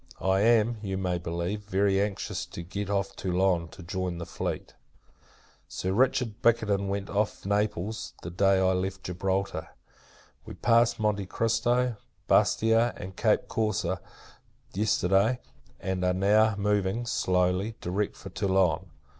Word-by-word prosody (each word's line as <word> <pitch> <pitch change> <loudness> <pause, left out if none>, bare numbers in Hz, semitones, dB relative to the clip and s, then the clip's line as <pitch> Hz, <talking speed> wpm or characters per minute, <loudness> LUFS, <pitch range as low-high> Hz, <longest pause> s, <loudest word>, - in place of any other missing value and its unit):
I 95 0 +2
am, 115 +1 +3
you 95 -3 -3
may 90 -2 -1
believe, 85 +4 -3
very 100 -1 +1
anxious 100 -1 -3
to 85 - -7
get 100 +3 -5
off 100 -1 -1
Toulon, 90 -2 +1
to 95 +2 -12
join 90 0 -3
the 85 - -5
fleet. 85 - -4 0.9
Sir 95 +1 -3
Richard 120 -1 +1
Bickerton 105 -4 +2
went 100 0 -2
from 100 - -6
off 105 -2 -1
Naples, 105 +1 -1
the 85 - -5
day 95 +2 +3
I 95 0 +3
left 95 +1 -3
Gibraltar. 95 -1 -2 0.7
We - - -9
passed 120 0 +3
Monte 105 -3 0
Christo, 120 +3 +1 0.3
Bastia, 115 +2 +3
and 95 -2 -8
Cape - - +2
Corse, 110 -4 -1 0.9
yesterday; 100 +2 +2 0.4
and 95 -1 -2
are 90 0 +2
now 105 +3 +4
moving, 105 +2 0
slowly, 90 0 +1
direct 100 +4 -2
for 95 - -9
Toulon. 95 -3 +1
100 Hz, 140 wpm, -28 LUFS, 95-110 Hz, 0.9 s, now